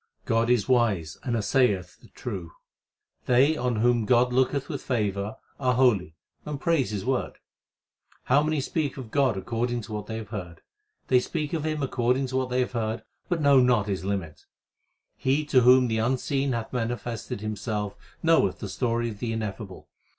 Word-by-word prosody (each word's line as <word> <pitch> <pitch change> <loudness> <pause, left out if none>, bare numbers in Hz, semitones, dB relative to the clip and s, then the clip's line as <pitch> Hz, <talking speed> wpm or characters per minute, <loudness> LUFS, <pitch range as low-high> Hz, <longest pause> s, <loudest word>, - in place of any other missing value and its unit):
God 115 +1 +1
is 120 -5 +2
wise 105 -11 +1
and 120 -2 -2
assayeth 100 -6 +1
the - - -16
true. 95 -9 -7 0.7
They 135 +5 +4
on 125 -4 -1
whom 120 0 +2
God 125 +1 +4
looketh 130 +2 +1
with 145 -5 -4
favour 105 -3 -1 0.2
are 125 -3 +2
holy 105 -11 +2 0.3
and 150 -2 -5
praise 165 -6 +1
His 105 -1 -4
word. 130 0 -1 0.9
How 140 +3 +4
many 155 -1 0
speak 145 0 -2
of 125 -5 -8
God 135 -7 +2
according 120 +4 -2
to 110 - -11
what 105 -1 -4
they 110 - -4
have 110 -2 -7
heard! 90 -6 -7 0.5
They 125 - +5
speak 150 +4 -3
of 160 -2 -1
Him 155 -2 -1
according 125 0 +1
to 130 - -1
what 130 -1 -1
they 125 +1 +1
have 125 - -1
heard, 110 -1 -2 0.3
but 175 -3 0
know 140 -2 +6
not 125 -5 +3
His 95 -2 -3
limit. 95 -6 -4 0.7
He 140 +3 +1
to 130 -3 +4
whom 125 +1 +6
the 110 -1 0
Unseen 130 +3 0
hath 115 +1 -4
manifested 115 -3 -3
Himself 105 -1 -3 0.3
knoweth 165 - +3
the 100 - -6
story 120 +2 -1
of 105 -2 -9
the 115 0 -2
Ineffable. 105 -3 -5
120 Hz, 180 wpm, -26 LUFS, 105-130 Hz, 0.9 s, know